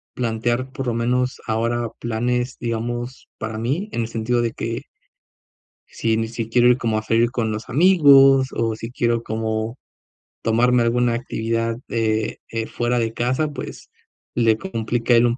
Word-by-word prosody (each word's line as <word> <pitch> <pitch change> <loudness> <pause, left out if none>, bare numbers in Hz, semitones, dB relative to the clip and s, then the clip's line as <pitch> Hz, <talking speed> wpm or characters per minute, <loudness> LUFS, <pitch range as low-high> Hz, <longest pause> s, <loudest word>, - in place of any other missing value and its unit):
plantear 120 +2 -1
por 135 - -4
lo 120 - +1
menos 125 +2 0
ahora 115 +1 0
planes, 120 +2 -1
digamos, 120 +1 -4
para 110 0 -4
mí 140 - -2
en - - -1
el 115 - -2
sentido 115 +1 0
de 115 - 0
que 115 0 -4 1.0
si 110 -1 -1
ni 115 0 -1
si 115 -1 -4
quiero 120 +1 +4
ir 125 - +4
como 110 -3 0
a - - -3
salir 115 +2 +2
con 115 -4 -1
los 110 +1 -6
amigos 135 -4 +6
o 115 -1 0
si 115 +1 -7
quiero 120 -1 0
como 110 +1 -2 0.7
tomarme 120 +2 +3
alguna 120 +1 +2
actividad, 115 -1 -2
eh 110 -1 0
eh 115 -1 -3
fuera 120 0 0
de 115 -1 -1
casa, 130 +6 0
pues 145 -3 -8 0.5
le 115 -2 +3
complica 120 -7 -1
a 115 - +7
él 120 - +5
un 120 +1 +1
115 Hz, 170 wpm, -22 LUFS, 115-125 Hz, 1.0 s, a